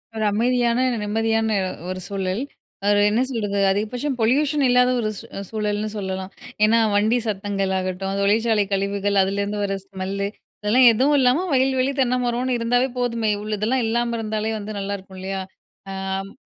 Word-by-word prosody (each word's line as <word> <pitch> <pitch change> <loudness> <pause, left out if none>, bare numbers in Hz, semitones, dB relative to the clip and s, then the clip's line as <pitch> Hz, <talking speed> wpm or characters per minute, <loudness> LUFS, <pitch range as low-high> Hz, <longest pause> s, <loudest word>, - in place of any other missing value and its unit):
1 220 -1 -1
அமைதியான, 235 +2 +2 0.3
நிம்மதியான 225 +1 +1 0.4
1 185 0 -4
சூழல். 195 +2 -2 0.5
1 205 0 +4
என்ன 220 +4 +2
சொல்றது. 205 -5 -2
அதிகபட்சம் 245 +7 -2
பொல்யூஷன் 280 +6 +2
இல்லாத 250 0 +4
1 215 - 0 0.4
சூழல்ன்னு 210 -1 -2
சொல்லலாம்! 190 -1 -4 0.3
ஏன்னா 225 +2 +5 0.2
வண்டி 215 +4 +3
சத்தங்கள் 195 -1 -1
ஆகட்டும், 190 +1 -3
தொழிற்சாலை 215 +1 +3
கழிவுகள், 200 +1 0
அதிலேருந்து 200 +2 -2
வர 195 -1 -1
ஸ்மெல் 190 0 -5
லு, 200 - 0 0.3
இதெல்லாம் 240 +4 +5
எதுவும் 270 +6 +3
இல்லாம 260 +8 +3
வயல்வெளி, 260 0 +2
தென்னமரன்னு 250 0 0
இருந்தாலே 245 +3 +2
போதுமே! 230 -3 0
இவ்வளதெல்லாம் 215 +4 -1
இல்லாம 235 +1 0
இருந்தாலே 215 0 -2
வந்து 210 0 -6
நல்லாயிருக்கும் 195 -1 -6
இல்லையா? 190 0 -3 0.5
ஆம் 195 +1 -4
215 Hz, 140 wpm, -22 LUFS, 200-240 Hz, 0.5 s, ஏன்னா